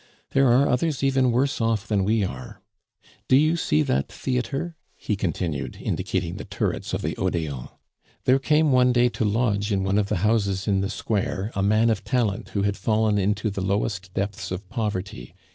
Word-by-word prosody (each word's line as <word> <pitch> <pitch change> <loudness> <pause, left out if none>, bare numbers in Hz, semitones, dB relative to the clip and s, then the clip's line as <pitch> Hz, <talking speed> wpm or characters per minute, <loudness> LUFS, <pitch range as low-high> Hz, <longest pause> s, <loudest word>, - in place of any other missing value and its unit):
There 135 0 +4
are 130 +4 +4
others 140 +2 0
even 135 -2 +3
worse 130 +2 +1
off 115 -2 0
than 100 -3 +1
we 110 +2 +2
are. 65 -8 -6 0.7
Do 130 - +5
you 155 +4 +4
see 75 - +1
that 70 -1 -1
theatre?" 135 +6 -3 0.2
he 105 - -2
continued, 80 -8 -3
indicating - - -2
the - - -6
turrets - - -3
of - - -4
the - - -2
Odeon. 75 -7 -2 0.6
"There 130 +1 +4
came 150 +2 +3
one 125 -1 +4
day 120 0 +4
to 115 - -3
lodge 105 -1 +1
in 95 -1 +1
one 95 +2 +2
of 100 -1 -1
the - - 0
houses 100 -3 +1
in 100 -2 +2
the 95 - -1
square 100 -1 -2
a 100 - -1
man 110 +3 +3
of 105 -4 -2
talent 115 -4 -1
who 100 - -1
had 100 0 0
fallen 110 0 +1
into 105 +2 0
the 100 - -4
lowest 95 -1 -1
depths 100 -1 -3
of 95 +1 -5
poverty. 95 - -4
105 Hz, 190 wpm, -24 LUFS, 95-125 Hz, 0.7 s, Do